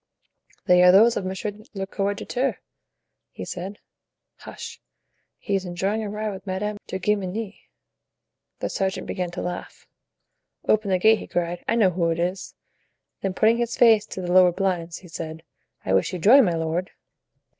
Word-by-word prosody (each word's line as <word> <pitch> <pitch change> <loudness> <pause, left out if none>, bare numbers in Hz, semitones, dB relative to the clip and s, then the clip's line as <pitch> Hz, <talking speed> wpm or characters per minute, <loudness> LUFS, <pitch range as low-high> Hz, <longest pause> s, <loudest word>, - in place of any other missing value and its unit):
"They 180 0 +5
are 180 0 +8
those 225 +5 +6
of 190 - -2
monsieur 190 +3 -3 0.2
le 195 0 -2
coadjuteur," 205 +7 -2 0.7
he - - -8
said. 190 +3 -6 0.6
"Hush; - - -9 0.6
he 200 - -4
is 195 -1 +1
enjoying 190 +4 -2
a 210 - -4
ride 210 +1 -3
with 195 +1 -9
Madame 205 +3 -2
de 190 - -3
Guemenee." 205 +2 -3 0.9
The - - -1
sergeant 190 0 -2
began 180 -1 -3
to 175 +1 -6
laugh. 175 0 -6 0.8
"Open 215 -1 +2
the 185 - +3
gate," 220 +4 +4
he - - -9
cried. 175 0 -2
"I - - +2
know 205 -5 +4
who 170 -1 0
it 165 - 0
is!" 180 +3 -3 0.7
Then 190 -1 -2
putting 225 +3 +4
his 235 -1 -2
face 220 -3 +5
to 190 - -6
the 175 -1 -3
lowered 180 -1 +6
blinds, 175 -4 -1
he 185 - -14
said: 160 -1 -7 0.4
"I 95 - 0
wish 95 - +2
you - - -2
joy, 225 +11 +7
my 180 -9 +2
lord!" 165 +3 -2
190 Hz, 170 wpm, -24 LUFS, 175-210 Hz, 0.9 s, are